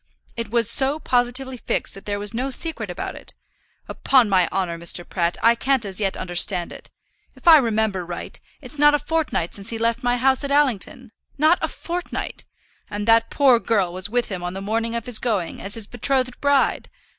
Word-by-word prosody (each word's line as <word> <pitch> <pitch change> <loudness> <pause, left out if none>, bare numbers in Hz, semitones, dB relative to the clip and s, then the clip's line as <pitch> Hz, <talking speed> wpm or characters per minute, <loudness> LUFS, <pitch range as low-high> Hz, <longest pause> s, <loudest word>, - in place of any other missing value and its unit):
It 230 -2 -4
was 230 0 +2
so 270 +5 +2
positively 255 -1 0
fixed - - -2
that 195 - -11
there 205 0 -2
was 205 +1 -4
no 255 +4 -2
secret 320 +5 +1
about - - -5
it. - - -7 0.5
Upon 255 -6 +2
my 185 -3 +3
honour, 185 -3 -2
Mr. 170 +1 -2
Pratt, 170 -1 -1
I 230 +1 +6
can't 260 0 0
as 195 0 -3
yet 195 -2 -1
understand 175 0 +1
it. - - -11 0.5
If - - -14
I 325 -2 +10
remember 220 -7 0
right, 175 0 -7 0.2
it's 300 - -11
not 295 0 +6
a - - +3
fortnight 295 - -2
since 200 -1 -5
he 230 - -2
left 230 +1 0
my 245 0 +1
house 265 +2 +2
at 280 - -3
Allington, 260 -3 0 0.3
not 310 +4 +4
a - - 0
fortnight. 350 +1 -5 0.4
And 205 +1 -5
that 230 0 +4
poor 265 -4 +4
girl 200 -7 0
was 185 +2 -2
with 240 +1 0
him 185 -3 -5
on 175 +1 -5
the - - -4
morning 225 +3 -2
of 235 - -4
his 245 -3 -1
going 210 -8 -2
as 200 - -4
his 225 -2 -2
betrothed 255 +2 -1
bride. 285 -1 +1
230 Hz, 200 wpm, -22 LUFS, 195-265 Hz, 0.5 s, I